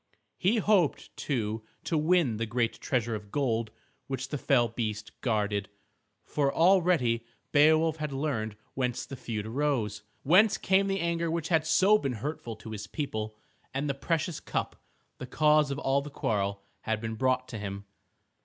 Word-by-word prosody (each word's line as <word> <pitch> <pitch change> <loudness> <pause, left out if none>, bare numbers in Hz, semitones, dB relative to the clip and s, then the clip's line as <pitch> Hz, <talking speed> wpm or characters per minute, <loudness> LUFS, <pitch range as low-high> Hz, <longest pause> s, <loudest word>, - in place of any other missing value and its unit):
He 200 +6 +3
hoped, 200 -7 +2
too, 110 -5 -2 0.2
to - - -1
win 155 -6 +3
the 115 +1 -2
great 115 +1 -1
treasure 120 -3 0
of 105 -2 -6
gold 115 -6 0 0.4
which 135 -1 -4
the 145 - -3
fell 125 -4 +3
beast 110 -2 -4
guarded. 105 -4 0 0.5
For 140 -2 0
already 165 -10 +3 0.3
Beowulf 155 +2 +5
had 150 -2 -3
learned 135 -7 -2 0.2
whence 125 -2 -1
the 135 - -7
feud 110 -4 -4
arose, 115 -4 -1 0.2
whence 195 +9 +5
came 195 +1 +2
the 195 0 0
anger 170 0 0
which 160 -1 -2
had 165 -3 +4
been - - -16
so 195 +6 +5
hurtful 125 -2 -4
to 110 +1 -10
his 105 -1 -6
people. 110 -6 -4 0.4
And 140 +2 -1
the 140 - 0
precious 160 +3 -1
cup, - - -3 0.4
the 130 - -6
cause 150 +2 +4
of 140 - -2
all 140 0 +1
the 145 - -7
quarrel, 100 -7 -1 0.2
had 110 -1 -2
been 110 0 -4
brought 130 +2 +1
to 115 - -5
him. 100 0 -5
135 Hz, 165 wpm, -29 LUFS, 110-155 Hz, 0.5 s, Beowulf